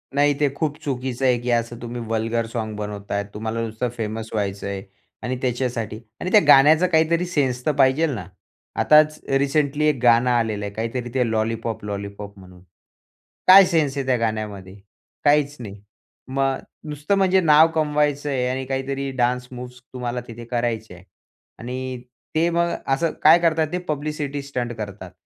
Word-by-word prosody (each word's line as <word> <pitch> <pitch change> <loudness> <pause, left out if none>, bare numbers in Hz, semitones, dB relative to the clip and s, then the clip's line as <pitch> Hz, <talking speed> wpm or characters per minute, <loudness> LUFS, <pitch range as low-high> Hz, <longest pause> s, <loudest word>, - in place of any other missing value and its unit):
नाही, 145 +1 +4
ते 145 -1 +3
खूप 150 -1 -2
चुकीचं 130 -1 -3
आहे. 125 -1 +4
की 125 - -4
असं 120 0 0
तुम्ही 120 0 -5
वल्गर 115 +1 -1
साँग 110 -2 -3
बनवताय. 100 -1 -4
तुम्हाला 110 +2 -3
नुसतं 110 +2 -3
फेमस 110 0 -4
व्हायचंय 100 -2 -3 0.4
आणि 130 - -2
त्याच्यासाठी 120 -4 -2 0.2
आणि 185 - -3
त्या 210 - +8
गाण्याचा 150 +5 +7
काहीतरी 165 +1 +2
सेन्स 130 -8 -1
तर 155 - +3
पाहिजेल 135 +5 +3
ना. 100 - -6 0.6
आताचं 155 -2 +3
रिसेंटली 145 +1 +1
एक 150 -2 +2
गाणं 120 +1 +5
आलेलं 110 -4 0
आहे. 100 - -6
काहीतरी 115 +3 -3
ते 125 -3 +1
लॉलीपॉप, 110 0 -2
लॉलीपॉप 100 0 -6
म्हणून. 90 -1 -15 0.9
काय 195 +1 +10
सेन्स 155 -6 0
आहे 135 - -2
त्या 130 -1 +2
गाण्यामध्ये? 105 -4 -4 0.5
काहीच 145 0 +3
नाही. 100 -4 -9 0.5
मग 135 0 0 0.3
नुसतं 150 +6 -1
म्हणजे 190 -1 +4
नाव 155 -1 +6
कमवायचंय 145 -4 0
आणि 130 +1 -3
काहीतरी 135 +1 -3
डान्स 125 0 0
मूव्हज 125 0 -9
तुम्हाला 125 -1 -3
तिथे 115 0 -9
करायच्या 115 -5 -2
आहे. 90 - -17 0.5
आणि 125 +1 -5 0.3
ते 165 +2 +3
मग 170 0 +1 0.2
असं 165 +3 0
काय 160 +3 +8
करत 165 -2 +1
आहेत 155 -1 0
ते - - +1
पब्लिसिटी 145 -1 -3
स्टंट 125 -4 -4
करतात. 100 -4 -7
125 Hz, 160 wpm, -22 LUFS, 110-150 Hz, 0.9 s, काय